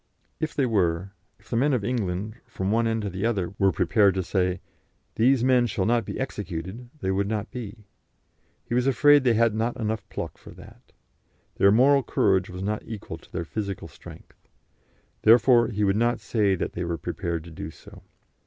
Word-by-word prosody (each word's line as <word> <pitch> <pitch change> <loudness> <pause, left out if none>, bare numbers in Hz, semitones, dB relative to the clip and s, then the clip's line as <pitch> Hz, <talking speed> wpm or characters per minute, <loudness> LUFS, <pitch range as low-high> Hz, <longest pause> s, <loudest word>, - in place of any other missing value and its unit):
If 155 -1 -3
they 140 - +2
were, 95 -5 0 0.3
if - - -24
the - - 0
men 140 +5 +2
of 115 -6 0
England, 105 -2 -2
from 100 -4 -3
one 115 +1 +2
end 110 -1 -1
to 100 - -2
the 95 +2 -5
other, 100 -6 -1
were 95 -1 +4
prepared 100 -3 +3
to 95 - -1
say, 90 0 0 0.5
'These 125 +2 +3
men 125 -2 +4
shall 95 -3 -1
not 120 0 +1
be - - -6
executed,' 105 -1 -5
they 95 - 0
would 100 +1 0
not 110 +1 -3
be. 110 -3 -8 0.8
He - - -5
was 125 +2 +2
afraid 145 +2 +5
they 120 -3 +3
had 115 -1 +3
not 115 +3 -1
pluck - - -11
enough 110 -1 -4
for - - -12
that. - - -16 0.7
Their 100 - +5
moral 135 +6 +5
courage 95 -6 +1
was 90 +1 -6
not 105 +1 -2
equal 110 -3 -8
to - - -21
their 85 - -4
physical 100 +2 -5
strength. - - -15 0.7
Therefore 120 +1 +6
he 105 -2 -2
would 95 -1 +2
not 120 +1 +1
say 105 -2 +1
that - - -4
they 90 - -3
were 85 -1 -2
prepared 85 -1 -4
to 85 - -12
do 80 -1 -7
so. - - -15
110 Hz, 195 wpm, -25 LUFS, 95-120 Hz, 0.8 s, Therefore